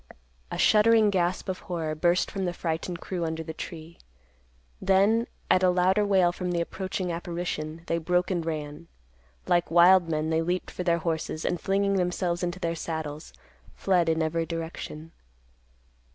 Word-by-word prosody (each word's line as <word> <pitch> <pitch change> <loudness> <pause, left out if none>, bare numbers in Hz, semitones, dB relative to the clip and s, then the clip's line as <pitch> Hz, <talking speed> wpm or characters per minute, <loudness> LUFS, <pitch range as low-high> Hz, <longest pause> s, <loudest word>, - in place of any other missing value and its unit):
A - - -4
shuddering 220 0 +5
gasp 180 0 0
of 185 -1 -3
horror 165 -3 -3
burst 175 +3 +1
from 195 -1 -2
the 175 - -1
frightened 170 +1 -3
crew 180 -3 -3
under 160 0 -3
the 160 0 -6
tree. 160 0 -9 0.8
Then, 200 +5 +3 0.2
at 185 - +4
a 185 - +4
louder 185 +3 +3
wail 190 -4 +3
from 180 0 -4
the 175 -1 0
approaching 185 +1 -3
apparition, 170 -2 -4
they 170 - -1
broke 180 +3 0
and 175 -3 -1
ran. 155 0 -5 0.6
Like 175 0 +2
wild 175 +1 +6
men 155 0 -1
they 160 0 +2
leaped 180 +2 -2
for - - -6
their 170 -1 +2
horses, 160 -1 -3
and, 175 - -1
flinging 200 0 +1
themselves 180 -1 -1
into 175 0 -3
their 170 -2 -1
saddles, 160 -2 -5 0.4
fled 180 -4 +2
in 160 0 +1
every 165 +1 -1
direction. 165 -1 -6
175 Hz, 165 wpm, -27 LUFS, 165-185 Hz, 0.8 s, wild